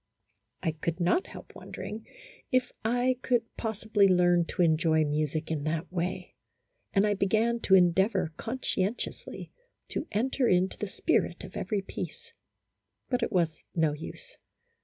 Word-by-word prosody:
I 160 - +2
could 160 +2 -3
not 180 - +2
help - - -11
wondering 215 +2 -7 0.4
if 255 -1 +2
I 245 +3 +1
could 245 -3 +2
possibly 215 -2 +2
learn 175 -2 +4
to 180 - 0
enjoy 160 -1 +3
music 155 +1 -1
in 150 -3 -1
that 160 +2 -2
way, 180 0 -3 0.6
and 195 +1 +3
I 210 - +3
began 220 +4 +2
to 190 - +4
endeavor 180 -1 +3
conscientiously 225 -2 -3 0.4
to - - -3
enter 250 +4 +1
into 185 0 +2
the 210 - -2
spirit - - 0
of - - -10
every 205 -4 -1
piece, - - -7 0.8
but 250 -1 +1
it - - 0
was 170 -5 0
no 160 -3 +2
use. 485 - -9
190 Hz, 140 wpm, -29 LUFS, 165-225 Hz, 0.8 s, learn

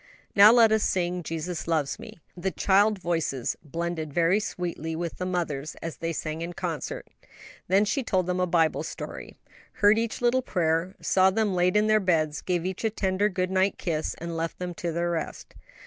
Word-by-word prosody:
"Now 205 +2 +9
let 230 -2 +6
us 220 0 +3
sing, 180 -2 0
'Jesus 165 +1 -4
loves 155 -4 0
me.'" - - -10 0.2
The 180 +2 -2
child 205 +3 +3
voices 165 -8 -1
blended 165 0 -4
very 170 +6 +3
sweetly 170 -5 -4
with 170 0 -4
the 180 - -2
mother's 155 -5 -3
as 165 -1 -7
they 165 0 -3
sang 155 0 -4
in 170 +1 -4
concert; 170 -6 -4 0.6
then 195 +3 +4
she 275 +6 0
told 185 -7 0
them 180 0 -1
a 180 - +1
Bible 165 -2 +2
story, - - -7 0.4
heard 210 +2 +4
each 230 -1 -2
little 245 +1 +2
prayer, 175 -3 0
saw 190 0 +4
them 210 0 0
laid 180 +2 +2
in 210 - +3
their 215 0 +4
beds, 160 -6 +1
gave 175 -2 -1
each 185 +2 -4
a 225 - +2
tender 200 -1 0
good 185 -1 -2
night 190 +1 +2
kiss, 155 -3 -2
and 170 0 -5
left 165 0 -3
them 180 -1 -4
to 170 0 -3
their 170 +1 -1
rest. 165 -2 -5
180 Hz, 195 wpm, -26 LUFS, 165-195 Hz, 0.6 s, Now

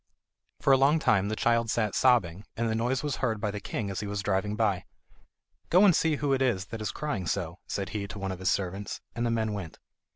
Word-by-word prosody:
For 140 - +5
a - - +7
long 140 +4 +4
time 105 -10 +2
the 110 - -1
child 115 0 +2
sat 105 -2 0
sobbing, 105 -8 +3
and 115 0 0
the 110 - 0
noise 120 +4 0
was 145 -4 -2
heard 110 -4 -1
by 105 0 -1
the 105 - -5
king 100 0 -4
as 95 - -3
he 105 - -4
was 100 0 -3
driving 105 +1 0
by. 100 -5 0 0.8
"Go 185 +4 +6
and 185 -5 +6
see 160 -2 +2
who 140 -1 0
it 135 - +1
is 115 -8 +1
that 115 -1 -6
is 105 - -2
crying 115 - -3
so," 85 -2 -2
said 100 -1 -3
he 100 -2 -4
to 100 - -8
one 95 -1 -3
of 95 - -6
his 95 -1 +1
servants, 95 +4 -2 0.2
and 120 +1 0
the - - 0
man 110 -2 0
went. 95 -6 -6
110 Hz, 250 wpm, -28 LUFS, 100-120 Hz, 0.8 s, a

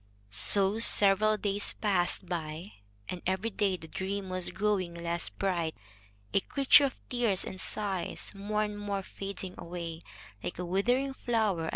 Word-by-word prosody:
So 195 - +5
several 215 -1 +5
days 205 0 0
passed 190 -3 0
by, 170 +1 -5 0.4
and 180 - -5
every 190 +5 -1
day 195 -2 0
the 160 - -11
dream 195 +2 -4
was 185 -1 -2
growing 190 -2 -1
less 170 0 -2
bright, 170 -5 -2 0.6
a - - +4
creature 275 +6 +5
of 270 - -3
tears 235 -6 +1
and 190 - -5
sighs, 195 -5 -1
more 210 +2 -1
and 210 -1 -5
more 200 -1 -3
fading 195 -1 -6
away, 170 -1 -6 0.4
like - - -5
a 180 - -3
withering 245 +10 +1
flower. 215 -11 0
195 Hz, 150 wpm, -30 LUFS, 175-210 Hz, 0.6 s, So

